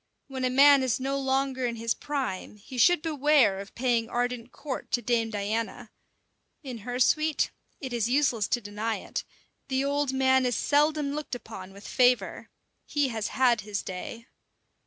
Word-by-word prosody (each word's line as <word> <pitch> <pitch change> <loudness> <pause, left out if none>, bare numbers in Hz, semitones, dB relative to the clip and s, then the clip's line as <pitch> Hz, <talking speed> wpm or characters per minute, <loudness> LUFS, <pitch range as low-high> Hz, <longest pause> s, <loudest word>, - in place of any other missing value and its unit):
When 265 -2 -5
a 255 - +2
man 280 +2 +7
is 260 -2 0
no 275 +1 -1
longer 265 -1 0
in 235 - -3
his 230 0 -1
prime, 265 -11 -4
he 250 +5 -8
should 350 +3 +5
beware 290 -10 +3
of 200 0 -10
paying 235 -2 +1
ardent 245 0 -2
court 280 -3 -6
to 240 - +2
Dame 230 -2 +1
Diana. 215 +2 -3 0.7
In 255 -4 -6
her 245 +4 -4
suite 310 +3 +2 0.3
it 260 -3 -6
is 235 -1 0
useless 250 -6 +2
to 240 +1 0
deny 210 +2 -3
it - - -5 0.4
the 265 0 0
old 285 -1 0
man 260 -1 +3
is 245 - 0
seldom 295 0 +2
looked 300 -3 -4
upon 195 -6 -9
with 200 +1 -12
favour: 250 -1 +2 0.4
he 290 -3 +1
has 220 -3 -2
had 245 -4 +2
his 205 -1 -4
day. 210 +5 -7
250 Hz, 170 wpm, -27 LUFS, 230-275 Hz, 0.7 s, man